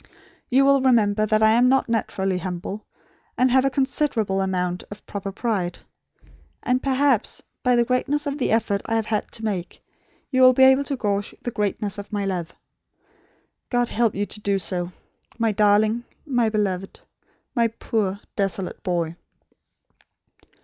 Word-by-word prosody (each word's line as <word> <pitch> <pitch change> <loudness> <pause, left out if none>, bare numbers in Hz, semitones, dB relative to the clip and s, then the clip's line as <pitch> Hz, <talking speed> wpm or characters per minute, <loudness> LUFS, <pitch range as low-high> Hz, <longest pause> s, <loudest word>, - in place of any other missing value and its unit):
You 270 +2 +4
will 275 -1 +5
remember 215 -5 +3
that 215 0 +2
I 220 - +6
am 245 +3 +4
not 270 +1 +3
naturally 195 -5 -1
humble; 185 +3 -5 0.5
and 255 0 +3
have 260 +1 +4
a - - +3
considerable 255 -7 0
amount 180 -2 -1
of 205 - -11
proper 200 -1 -5
pride; 195 -4 -2 0.9
and, 255 0 +1
perhaps, 270 -3 +1 0.2
by 250 -2 +3
the 240 0 +3
greatness 280 +4 0
of 285 0 -3
the - - 0
effort 215 -3 +1
I 225 - 0
have 225 -1 0
had 215 -1 -2
to 225 - -5
make, 185 -5 -3 0.5
you 260 -1 +2
will 255 0 +8
be 265 - +4
able 265 +1 +6
to 275 - -2
gauge 205 -3 -2
the 245 - -3
greatness 210 -1 -2
of 200 - -9
my 205 -1 -1
love. 175 -4 -3 1.2
God 245 -1 +1
help 230 -1 +1
you 205 +1 -1
to 210 - -9
do 200 -1 0
so 180 0 -2 0.5
my 230 -1 +1
darling; 215 +2 +3 0.2
my 245 -6 +1
beloved; 195 -3 -2 0.5
my 235 -3 +3
poor 210 -3 -2
desolate 195 -2 -2
boy!" 170 -4 -1
215 Hz, 160 wpm, -23 LUFS, 195-250 Hz, 1.2 s, will